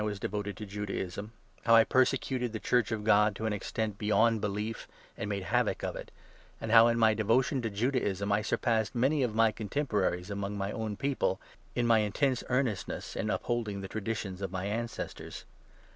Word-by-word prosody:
was 105 -1 -2
devoted 105 0 -3
to 105 - -6
Judaism 100 0 -4 0.2
— - - -31
how 115 -1 +6
I 115 - +8
persecuted 130 -1 +1
the 110 - -3
Church 120 +1 +1
of 110 -2 -2
God 105 -1 +4
to 110 - -4
an 110 - 0
extent 105 +1 -3
beyond 110 +1 +3
belief, 105 +2 -3 0.3
and 100 - -4
made 100 -2 -2
havoc - - 0
of - - -2
it, - - -7 0.5
and 110 - -4
how, 115 0 +8
in 115 0 +2
my 110 -1 +5
devotion 120 +5 +2
to 115 - -2
Judaism, 105 -3 0
I 105 +1 +3
surpassed 110 0 0
many 135 +5 +2
of 120 -4 0
my 115 0 +5
14 - - -23
contemporaries 105 -6 -1
among 100 0 -3
my 100 0 -2
own 110 -2 -4
people 135 -9 0 0.4
in 120 - +1
my 115 -1 +5
intense 125 +5 +1
earnest 125 -5 0
ness - - -6
in - - -2
upholding 110 -5 -2
the 95 - -5
traditions 105 -2 -4
of 95 -2 -3
my 95 0 -3
ancestors. 115 +3 -5
110 Hz, 195 wpm, -30 LUFS, 100-115 Hz, 0.5 s, I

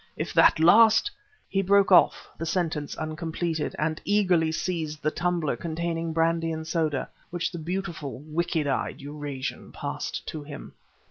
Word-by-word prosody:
If - - -3
that - - +5
last 220 - +6 0.2
..." 430 - -34
He 195 - 0
broke 200 +1 +4
off, 180 - +5
the 165 - -5
sentence 160 -4 -1
uncompleted, 160 0 -3
and 155 +1 -1
eagerly 185 -6 +2
seized 160 -3 -3
the 155 - +2
tumbler 175 -4 0
containing 165 0 -3
brandy 165 0 +1
and 160 0 -4
soda, 155 -4 0 0.2
which 175 -1 -2
the 175 - -6
beautiful, 170 -4 -4
wicked 160 0 -1
eyed 135 -2 -1
Eurasian 145 -1 -6
passed 145 0 -5
to 155 - -5
him. 145 0 -9
165 Hz, 150 wpm, -26 LUFS, 155-175 Hz, 0.2 s, last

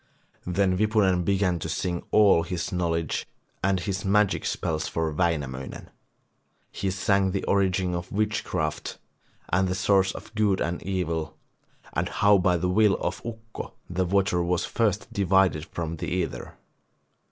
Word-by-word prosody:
Then 90 0 +2
Wipunen 105 -4 +3
began 95 -2 +1
to 80 - -4
sing 85 +2 -2
all 100 -5 +5
his 85 0 -3
knowledge 85 -3 -1 0.4
and 95 -1 +2
his 95 +2 -3
magic 100 +1 +2
spells 80 -1 -2
for 80 -1 -1
Wainamoinen. 75 -6 -2 0.8
He 95 - -2
sang 100 0 +2
the 95 +1 -2
origin 95 -2 +1
of 85 +1 -4
witchcraft, 105 -7 -2 0.6
the 90 0 +2
source 95 0 +3
of - - -10
good 105 -3 +2
and 85 +1 -2
evil 85 -4 -2 0.6
and - - -1
how 100 -1 +4
by 90 -1 +3
the 90 +2 -1
will 100 +2 +4
of - - -3
Ukko 110 -1 -8
the 90 +1 -1
water 95 -1 +2
was 85 0 0
first 105 -3 -1
divided 95 -5 +2
from 85 -1 -4
the - - -4
ether. 90 -2 -3
95 Hz, 140 wpm, -26 LUFS, 85-100 Hz, 0.8 s, all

